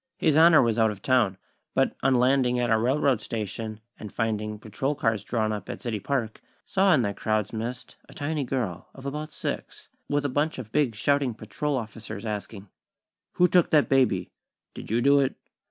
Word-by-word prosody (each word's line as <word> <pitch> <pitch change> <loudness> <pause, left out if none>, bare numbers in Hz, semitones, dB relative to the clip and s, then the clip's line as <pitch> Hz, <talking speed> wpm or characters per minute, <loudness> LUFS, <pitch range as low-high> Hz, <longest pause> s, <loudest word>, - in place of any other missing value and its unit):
His 155 - +2
Honor 160 -2 +7
was 115 -1 +1
out 110 0 +4
of 100 -2 -7
town; 125 -8 +2 0.4
but - - +2
on 135 -1 +3
landing 125 0 +3
at 120 -1 0
our 110 - +4
railroad 130 -1 +2
station, 110 0 -5 0.2
and 105 - -8
finding 110 -2 -2
patrol 130 +7 -3
cars 115 -6 0
drawn 110 -2 -1
up 105 -2 -5
at - - -6
City 115 -4 -2
Park, 120 -3 -2 0.2
saw, 195 0 +3
in 130 - +2
that 100 -2 -2
crowd's 110 -1 -1
midst, 120 +3 -5
a - - -12
tiny 145 0 -2
girl, 120 -10 -3
of 135 - -11
about 150 +2 -4
six, - - -6 0.2
with 145 0 0
a - - +3
bunch 145 +4 -1
of 115 -4 -8
big 140 -5 +1
shouting 135 +1 +1
patrol 145 +4 -3
officers, 110 -1 -7
asking: 105 -1 -5 0.7
"Who 180 - +4
took 175 0 +4
that 150 -2 +3
baby?" 125 -9 +2 0.4
"Did - - -9
you 115 +3 +1
do 140 +1 +5
it?" 135 -2 +1
120 Hz, 190 wpm, -26 LUFS, 110-140 Hz, 0.7 s, Honor